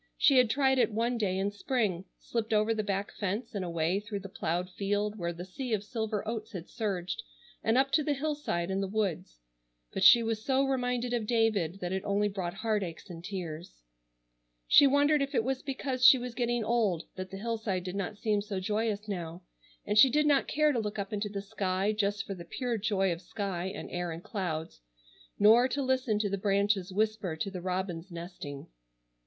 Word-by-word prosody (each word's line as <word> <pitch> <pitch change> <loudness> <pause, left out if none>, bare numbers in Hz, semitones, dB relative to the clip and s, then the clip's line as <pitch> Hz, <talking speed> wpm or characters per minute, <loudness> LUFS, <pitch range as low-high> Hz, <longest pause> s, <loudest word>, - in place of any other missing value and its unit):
She 275 - +5
had 250 -3 +4
tried 265 +1 +3
it 245 - +3
one 235 +3 0
day 190 -3 0
in 195 +1 0
spring; 205 -4 -1
slipped 225 -1 -3
over 215 +1 +3
the 220 - -1
back 200 -1 -2
fence 210 +4 -3
and 200 -3 -2
away 170 +2 0
through 205 -1 -5
the 195 - -8
ploughed 175 -1 -2
field 205 +2 -1
where 170 -1 -1
the 175 +1 -7
sea 245 +5 -4
of 205 - -5
silver 220 -2 -3
oats 220 -1 -4
had 180 -3 -6
surged, 195 - -3 0.4
and 225 +2 +3
up 270 +1 +3
to 305 - +4
the 290 0 0
hillside 275 - -2
and 190 +1 0
the 195 - -1
woods; 190 - -2 0.5
but - - -1
she 235 - +9
was 225 -1 -2
so 270 +1 +2
reminded 250 -2 -1
of 230 -3 -1
David 210 -7 +1
that 175 0 -3
it 190 +1 -2
only 205 +1 +1
brought 190 -3 -4
heart 215 0 0
aches 175 +1 -7
and 165 -1 -9
tears. 170 - -6 0.8
She 285 - +8
wondered 285 +2 +4
if 275 +1 -2
it 225 - +3
was 265 +1 -1
because 265 -1 -3
she 260 +1 +10
was 250 -1 -5
getting 240 -1 0
old 210 -7 +1
that 185 0 -6
the 195 - -7
hillside 220 -4 -2
did 180 +1 -5
not 200 +1 -3
seem 210 -1 +1
so 200 -2 -4
joyous 210 +2 -1
now, 175 -3 -5 0.4
and 210 +1 +3
she 265 - +9
did 300 +3 +2
not 285 -2 +3
care 305 0 +3
to 250 - 0
look 210 -1 -3
up 200 0 -4
into 210 0 -2
the 200 -1 -5
sky 195 -1 -1
just 205 -1 -1
for 195 - -4
the 175 -3 -8
pure 235 +6 -3
joy 195 -3 +1
of 170 - -8
sky 185 -1 -4
and 190 - -6
air 175 0 -2
and 165 +2 -7
clouds, 160 - -4 0.6
nor 225 +4 +6
to 280 +1 -2
listen 255 -4 +1
to 210 0 0
the 200 0 -2
branches 200 -1 +1
whisper 210 -3 0
to 195 +5 -3
the 185 -2 -6
robins 185 -1 -3
nesting. 170 -5 -7
205 Hz, 210 wpm, -30 LUFS, 185-235 Hz, 0.8 s, she